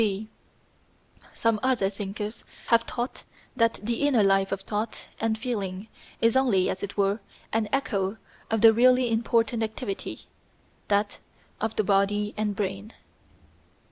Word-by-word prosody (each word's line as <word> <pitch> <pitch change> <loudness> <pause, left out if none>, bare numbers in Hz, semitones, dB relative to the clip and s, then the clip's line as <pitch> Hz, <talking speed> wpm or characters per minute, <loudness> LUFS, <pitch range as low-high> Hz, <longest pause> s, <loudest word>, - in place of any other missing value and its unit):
(b) 210 0 0 1.0
Some 230 -2 +1
other 255 -7 +2
thinkers 205 +2 -5 0.3
have 230 0 +4
taught 240 +1 -4 0.3
that 230 -2 +3
the 235 +4 -1
inner 245 -7 +4
life 195 0 +3
of 195 -1 -2
thought 215 +3 -4
and 220 0 0
feeling 210 -4 -4 0.3
is 230 +1 +4
only, 235 -9 +3
as 185 - -5
it 200 0 -5
were, 200 +2 +2 0.3
an 220 -1 +1
echo 205 -7 0 0.3
of 225 -1 +1
the 225 -1 +8
really 250 +1 +4
important 230 +1 +1
activity 220 -2 -4 0.7
that 205 0 +1 0.4
of 220 +1 -2
the 215 - +2
body 205 +2 +2
and 210 -1 -1
brain. 195 +2 -3
215 Hz, 140 wpm, -27 LUFS, 200-230 Hz, 1.0 s, the